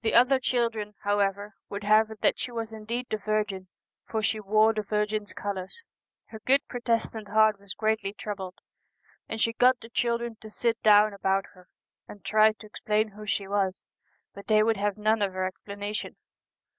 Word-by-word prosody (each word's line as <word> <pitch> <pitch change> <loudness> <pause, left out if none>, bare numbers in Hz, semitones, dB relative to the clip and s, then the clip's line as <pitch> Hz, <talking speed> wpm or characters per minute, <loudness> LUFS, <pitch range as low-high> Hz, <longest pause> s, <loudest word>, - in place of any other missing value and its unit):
The 220 - +1
other 255 +3 +6
children, 230 -5 -1
however, 205 0 0 0.2
would 200 +1 -5
have 215 +1 +4
it 220 -1 -11
that - - +2
she 245 +2 -4
was 225 -1 -4
indeed 225 +3 -4
the 215 - +1
Virgin, 210 -3 -2 0.4
for 220 -1 -3
she 215 +1 +1
wore 215 +2 +3
the 215 - -1
Virgin's 210 0 -1
colours. 195 - -5 0.5
Her 220 - -9
good 270 +5 +2
Protestant 230 -3 -2
heart 215 0 +4
was 200 -1 -9
greatly 220 -2 0
troubled, 195 -3 -6 0.7
and 220 - -4
she 230 +1 +2
got 250 +2 +4
the 225 - -12
children 235 -1 -1
to 220 - -9
sit 230 +1 -1
down 210 0 +6
about 195 0 0
her, 180 -2 -19 0.4
and 205 - -13
tried 215 0 +4
to - - -10
explain 215 +1 -1
who 210 +1 -11
she 200 -1 -1
was, 195 -1 -1 0.5
but 200 - -11
they 215 -1 +5
would 225 -1 +2
have 205 0 -1
none 215 +1 +2
of 195 -2 0
her 185 0 -1
explanation. 205 +2 -5
215 Hz, 180 wpm, -27 LUFS, 205-225 Hz, 0.7 s, other